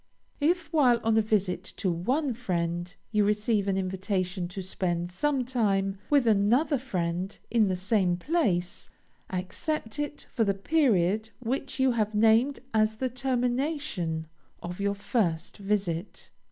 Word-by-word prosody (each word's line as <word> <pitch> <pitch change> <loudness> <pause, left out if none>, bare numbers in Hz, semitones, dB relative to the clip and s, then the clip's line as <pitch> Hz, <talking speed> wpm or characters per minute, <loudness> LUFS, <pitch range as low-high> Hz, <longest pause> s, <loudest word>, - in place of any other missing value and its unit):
If, 325 +1 +1
while 255 -6 +5
on 225 0 +2
a 220 - +5
visit 195 -4 0
to 185 - 0
one 255 - 0
friend, 175 -6 -2 0.2
you 210 -1 +3
receive 210 0 +1
an 195 -1 +1
invitation 185 -1 -2
to 190 +2 -6
spend 175 -2 -2
some 270 +6 0
time 195 -6 0
with 285 -4 +4
another 235 +7 +3
friend 185 -6 -3
in 225 -3 +4
the 185 - 0
same 185 -1 +1
place, 180 - 0 0.4
accept 215 +7 -3
it 295 0 -4
for 235 - +2
the 200 -2 +1
period 215 - +2
which 265 +3 -3
you 265 -1 +4
have 215 -2 0
named 225 +6 +4
as 215 0 +3
the 255 +3 -1
termination 250 - -1 0.4
of 175 +2 -6
your 200 0 0
first 200 -6 -1
visit. 195 -3 -2
210 Hz, 140 wpm, -28 LUFS, 185-250 Hz, 0.4 s, while